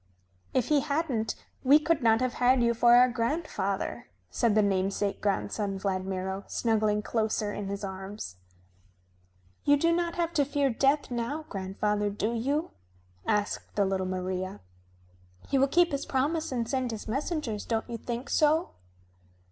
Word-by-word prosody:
"If 255 Hz, -3 st, 0 dB
he 300 Hz, -1 st, +5 dB
hadn't 280 Hz, -6 st, -1 dB, 0.3 s
we 280 Hz, +3 st, +7 dB
could 310 Hz, 0 st, +1 dB
not 225 Hz, 0 st, +4 dB
have 255 Hz, -1 st, 0 dB
had 250 Hz, 0 st, +5 dB
you 235 Hz, 0 st, +3 dB
for 240 Hz, +1 st, +5 dB
our 250 Hz, +1 st, +7 dB
grandfather," 230 Hz, -, -2 dB, 0.2 s
said 225 Hz, -, +2 dB
the 215 Hz, -, +5 dB
namesake 195 Hz, +1 st, 0 dB
grandson 200 Hz, 0 st, -1 dB
Vladmiro, 190 Hz, 0 st, -2 dB
snuggling 215 Hz, -2 st, +1 dB
closer 215 Hz, -2 st, -1 dB
in 205 Hz, -, -4 dB
his 200 Hz, +1 st, -4 dB
arms. 190 Hz, -, -6 dB, 1.3 s
"You 290 Hz, 0 st, +5 dB
do 335 Hz, +3 st, +3 dB
not 340 Hz, -1 st, -1 dB
have 340 Hz, -1 st, -1 dB
to 290 Hz, -, +3 dB
fear 280 Hz, -1 st, +1 dB
Death 275 Hz, +4 st, +2 dB
now, 245 Hz, +6 st, -3 dB
grandfather, 205 Hz, +2 st, -1 dB
do 210 Hz, +3 st, -2 dB
you?" 280 Hz, +8 st, -1 dB, 0.6 s
asked 210 Hz, -1 st, -1 dB
the 200 Hz, -, +3 dB
little 190 Hz, -1 st, -1 dB
Maria. 185 Hz, -, -3 dB, 0.9 s
"He 275 Hz, -, +2 dB
will 275 Hz, -, +4 dB
keep 345 Hz, +4 st, +3 dB
his 280 Hz, -1 st, -3 dB
promise 295 Hz, +4 st, 0 dB
and 235 Hz, -3 st, -1 dB
send 260 Hz, 0 st, -1 dB
his 220 Hz, -2 st, -6 dB
messengers, 260 Hz, -, -2 dB
don't 225 Hz, -1 st, -2 dB
you 235 Hz, -1 st, -5 dB
think 240 Hz, +4 st, -4 dB
so?" 315 Hz, +3 st, +3 dB
230 Hz, 155 wpm, -28 LUFS, 200-280 Hz, 1.3 s, we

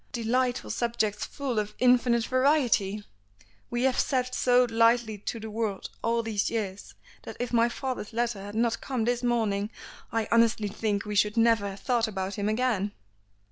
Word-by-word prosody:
Delightful 245 Hz, +1 st, 0 dB
subjects 220 Hz, -3 st, -1 dB
full 265 Hz, -6 st, -3 dB
of 210 Hz, 0 st, -4 dB
infinite 245 Hz, -2 st, +3 dB
variety! 255 Hz, -7 st, +2 dB, 0.7 s
We 240 Hz, +1 st, -1 dB
have 260 Hz, -1 st, +2 dB
sat 255 Hz, -1 st, 0 dB
so 250 Hz, 0 st, +4 dB
lightly 230 Hz, -1 st, +2 dB
to 225 Hz, +3 st, -4 dB
the 220 Hz, 0 st, -7 dB
world 215 Hz, -3 st, -3 dB
all 230 Hz, 0 st, 0 dB
these 215 Hz, -3 st, -1 dB
years, 205 Hz, -4 st, -4 dB, 0.3 s
that -, -, -9 dB
if 245 Hz, 0 st, -3 dB
my 235 Hz, 0 st, +4 dB
father's 250 Hz, -3 st, -4 dB
letter 235 Hz, -3 st, -1 dB
had 205 Hz, +1 st, -8 dB
not 230 Hz, 0 st, +1 dB
come 250 Hz, -5 st, -2 dB
this 245 Hz, 0 st, 0 dB
morning 220 Hz, -4 st, 0 dB, 0.4 s
I 225 Hz, -1 st, -1 dB
honestly 230 Hz, -2 st, +3 dB
think 205 Hz, 0 st, -2 dB
we 210 Hz, -, -4 dB
should 210 Hz, +2 st, +2 dB
never 225 Hz, -3 st, +3 dB
have 195 Hz, 0 st, -9 dB
thought 240 Hz, -3 st, +1 dB
about 190 Hz, -2 st, -3 dB
him 205 Hz, +1 st, -1 dB
again." 215 Hz, -3 st, 0 dB
230 Hz, 170 wpm, -27 LUFS, 210-245 Hz, 0.7 s, so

